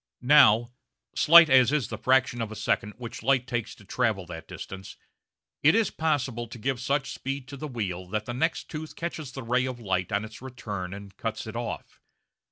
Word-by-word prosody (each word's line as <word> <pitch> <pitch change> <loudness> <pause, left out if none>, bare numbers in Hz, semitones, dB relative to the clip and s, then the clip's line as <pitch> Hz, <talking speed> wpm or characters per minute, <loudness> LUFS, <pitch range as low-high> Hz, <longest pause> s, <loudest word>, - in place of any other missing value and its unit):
Now, 120 -4 +6 0.5
slight 170 +1 +8
as 130 -2 +5
is 140 -7 0
the - - -5
fraction 130 -2 +2
of 110 -1 -3
a - - -6
second 105 0 -1
which 120 -2 -7
light 130 0 +2
takes 120 -3 -3
to 105 - -18
travel 100 -2 0
that 80 -2 -9
distance, 95 0 -9 0.6
it 150 +7 +5
is 225 -4 +2
possible 135 -7 -1
to 115 - -10
give 130 +2 -2
such 140 +2 -1
speed 135 -1 -5
to 140 - -7
the 150 +3 -6
wheel 95 -8 -4
that 105 +3 -3
the 120 - -4
next 160 +7 0
tooth 155 0 -7
catches 160 -5 -5
the 135 0 -7
ray 125 +2 +1
of 125 -2 -5
light 95 -5 -1
on 100 +2 0
its 110 +1 -12
return 105 -8 -6
and 100 -1 -11
cuts 110 -1 -4
it 110 +1 -8
off. 120 0 -6
120 Hz, 200 wpm, -27 LUFS, 105-135 Hz, 0.6 s, slight